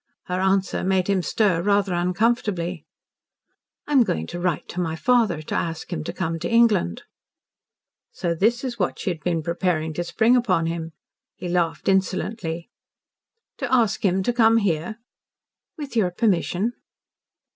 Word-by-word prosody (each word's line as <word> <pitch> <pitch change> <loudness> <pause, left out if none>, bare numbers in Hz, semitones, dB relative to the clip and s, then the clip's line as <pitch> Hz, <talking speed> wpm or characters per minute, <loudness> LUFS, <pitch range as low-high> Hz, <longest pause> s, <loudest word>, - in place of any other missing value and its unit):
Her 180 0 -3
answer 190 0 +1
made 185 -1 +1
him 195 -2 +2
stir 185 -2 +1
rather 200 0 +2
uncomfortably. 180 -2 0 1.0
"I - - -8
am 275 -3 +6
going 135 - 0
to 175 - -4
write 175 -4 -1
to 180 - -5
my 165 -2 -2
father 215 -5 +2
to - - -6
ask 165 +2 -3
him 155 -3 -3
to - - -3
come 165 -3 -3
to - - -3
England." 230 - +3 1.1
So 170 -3 -2
this 225 +9 +1
was 240 -3 -4
what 180 - 0
she 190 - -2
had 165 - -5
been 165 -1 -1
preparing 170 -2 -1
to 175 - -2
spring 220 +8 +3
upon 190 -9 +2
him. 165 -1 -4 0.4
He 180 - -6
laughed 175 -2 -1
insolently. 190 -1 -1 0.9
"To 275 -3 -3
ask 235 -5 +2
him 190 -1 +2
to 245 - 0
come 225 -1 +5
here?" 190 0 -1 0.8
"With 290 -5 -7
your 205 -6 +3
permission." 195 +2 0
185 Hz, 155 wpm, -23 LUFS, 170-220 Hz, 1.1 s, am